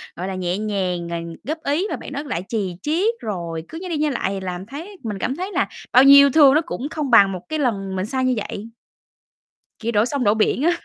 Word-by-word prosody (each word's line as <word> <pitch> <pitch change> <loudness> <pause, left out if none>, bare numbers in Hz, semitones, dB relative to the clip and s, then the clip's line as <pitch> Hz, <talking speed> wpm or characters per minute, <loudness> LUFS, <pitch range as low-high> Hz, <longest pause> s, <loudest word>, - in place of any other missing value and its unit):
gọi 180 +2 -4
là, 190 - -4
nhẹ 180 0 -2
nhàng 185 -5 -2
rồi 170 0 -4 0.2
góp 310 +3 -3
ý, 310 +9 0
mà - - -2
bạn - - -9
đó 285 +1 -4
lại 255 - -3
chì 200 -6 -2
chiết 360 - +1
rồi 170 -6 -4
cứ 325 - -8
nhai 370 - -6
đi 325 - -1
nhai 300 0 +1
lại 235 -7 -1
thì 195 0 -3
làm 185 0 -5
thấy 325 - -9
mình 210 -3 -4
cảm 260 - -1
thấy 370 +4 -5
là 365 - 0 0.2
bao 255 +2 +7
nhiêu 275 +1 +9
yêu - - +4
thương 280 -2 +7
nó 310 - +4
cũng 285 -3 -5
không 305 -4 -3
bằng 200 -4 +7
một 185 -2 -5
cái 310 0 -2
lần 195 -8 -1
mình 185 0 -1
sai 260 +3 -1
như 255 - +2 0.2
vậy. 215 +3 -7 1.1
Kiểu 230 0 -2
đổ 210 0 +3
sông 275 +1 -2
đổ 205 -2 +4
biển 220 +4 +1
á. 340 - +4
235 Hz, 260 wpm, -21 LUFS, 190-295 Hz, 1.1 s, nhiêu